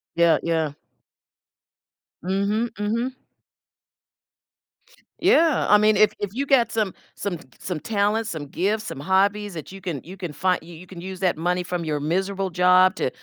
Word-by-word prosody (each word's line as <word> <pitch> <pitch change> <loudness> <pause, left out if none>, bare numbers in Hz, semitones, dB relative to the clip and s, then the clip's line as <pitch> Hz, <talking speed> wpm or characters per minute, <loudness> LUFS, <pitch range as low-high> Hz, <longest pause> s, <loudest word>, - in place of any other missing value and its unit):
Yeah, 170 -1 +5
yeah. 160 -3 0 1.5
Mhm, 200 +5 0
mhm. 235 +5 -1 2.0
Yeah. 320 -4 +4
I 210 - +7
mean, 215 0 +4
if 215 +1 +5
if 205 - -2
you 275 +3 -1
got 265 -4 +3
some 215 -4 0 0.2
some 190 -4 -3
t - - -15
c - - -24
some 180 -4 -4
talents, 215 +3 0
some 160 -6 -5
gifts, 205 +9 -1
some - - -6
hobbies 200 +4 +1
that 160 - -7
you 195 0 -10
can 175 -7 -3
you 180 +4 -10
can 180 -4 -6
fin 180 +5 +1
you 170 +1 -12
you 175 +3 -12
can 180 -2 -10
use 185 0 -7
that 180 -4 +1
money 180 +2 0
from 175 -1 -3
your 150 -2 -1
miserable 190 +5 -1
job 180 +1 +5
to - - -1
190 Hz, 170 wpm, -23 LUFS, 170-210 Hz, 2.0 s, I